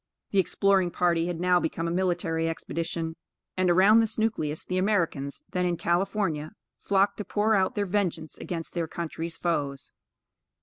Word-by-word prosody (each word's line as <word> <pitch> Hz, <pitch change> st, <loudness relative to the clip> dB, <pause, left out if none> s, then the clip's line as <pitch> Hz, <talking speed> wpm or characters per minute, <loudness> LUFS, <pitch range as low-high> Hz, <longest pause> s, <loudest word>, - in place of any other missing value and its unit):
The 200 Hz, -, +3 dB
exploring 190 Hz, 0 st, +3 dB
party 170 Hz, -1 st, +1 dB
had 175 Hz, -2 st, -3 dB
now 180 Hz, 0 st, +3 dB
become 165 Hz, 0 st, -2 dB
a -, -, -1 dB
military 175 Hz, -2 st, 0 dB
expedition, 165 Hz, 0 st, -3 dB, 0.4 s
and 185 Hz, -1 st, +2 dB
around 195 Hz, +6 st, +6 dB
this 225 Hz, -1 st, 0 dB
nucleus 180 Hz, -9 st, -1 dB
the 185 Hz, 0 st, -1 dB
Americans, 170 Hz, -8 st, 0 dB
then 180 Hz, -, 0 dB
in 175 Hz, -1 st, 0 dB
California, 175 Hz, -3 st, 0 dB, 0.3 s
flocked 200 Hz, 0 st, +2 dB
to 210 Hz, -, -3 dB
pour 210 Hz, +2 st, +1 dB
out 190 Hz, -3 st, +2 dB
their 205 Hz, -, 0 dB
vengeance 180 Hz, -5 st, -1 dB
against 165 Hz, -2 st, -5 dB
their 170 Hz, -2 st, -1 dB
country's 165 Hz, 0 st, -5 dB
foes. 145 Hz, -5 st, -2 dB
175 Hz, 160 wpm, -27 LUFS, 165-195 Hz, 0.4 s, around